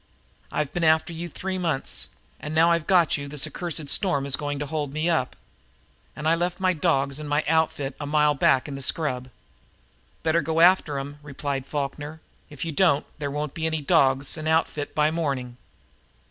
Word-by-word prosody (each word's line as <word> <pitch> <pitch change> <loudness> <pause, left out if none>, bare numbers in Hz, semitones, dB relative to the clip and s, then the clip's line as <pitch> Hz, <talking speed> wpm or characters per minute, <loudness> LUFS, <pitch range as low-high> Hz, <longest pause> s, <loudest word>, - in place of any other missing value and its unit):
"I've 150 -2 -2
been 175 - -1
after 160 +1 +3
you 170 +1 -5
three 185 +3 -4
months, 160 -7 -2 0.3
and 150 +1 -5
now 165 +2 +5
that - - +5
I've 170 -2 -1
got 175 -5 +4
you 140 0 -6
this 140 -1 -2
accursed 165 -4 -3
storm 160 -6 +1
is 140 -1 +1
going 145 -1 -3
to 145 - -3
hold 150 -1 -3
me 155 +4 0
up! 130 -6 0 0.8
And 155 +1 -3
I 160 - +5
left 175 +2 -1
my 185 -1 +3
dogs 145 -4 0
and 150 -1 -6
outfit 150 -2 +1
a 145 - -4
mile 150 0 +3
back 135 -1 +3
in 145 - -6
the 135 - -6
scrub." 130 -3 -1 0.9
"Better 165 +1 +2
go 160 0 -1
after 170 -4 +5
'em," 140 +2 -6
replied 140 -2 -4
Falkner. 145 +2 -4 0.3
"If 145 +2 -6
you 165 - -2
don't 155 -2 +3
there 145 -1 -2
won't 150 0 -3
be 160 -1 -2
any 160 -1 -1
dogs 135 +2 +3
an' 155 - -4
outfit 160 -2 0
by 150 0 +3
morning." 135 -7 -2
150 Hz, 190 wpm, -25 LUFS, 140-165 Hz, 0.9 s, now